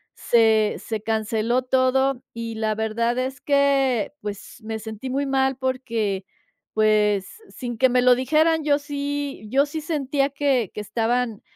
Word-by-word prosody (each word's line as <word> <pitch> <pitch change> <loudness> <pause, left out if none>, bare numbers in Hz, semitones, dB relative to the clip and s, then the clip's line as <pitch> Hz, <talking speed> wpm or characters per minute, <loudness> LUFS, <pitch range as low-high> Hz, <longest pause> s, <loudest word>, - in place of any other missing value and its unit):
Se 220 -2 +3
se 220 -2 -4
canceló 225 +3 0
todo, 260 0 +1
y 230 -1 -5
la 220 -1 0
verdad 230 +2 -1
es 260 0 -3
que 275 -5 +2
pues 205 -1 -7
me 220 0 -4
sentí 220 +4 -7
muy 275 +2 -1
mal 265 -1 +1
porque, 230 -7 -2 0.5
pues, 210 -2 +3 0.2
sin 240 -3 -6
que 260 +2 +4
me 250 0 +3
lo 250 0 +6
dijeran, 315 +5 +2
yo 290 -1 +2
sí 285 -3 -4
yo 275 +4 +3
sí 310 +2 -5
sentía 285 -3 0
que 275 -6 0
que - - -6
estaban, 225 +1 -1
250 Hz, 150 wpm, -23 LUFS, 220-275 Hz, 0.5 s, lo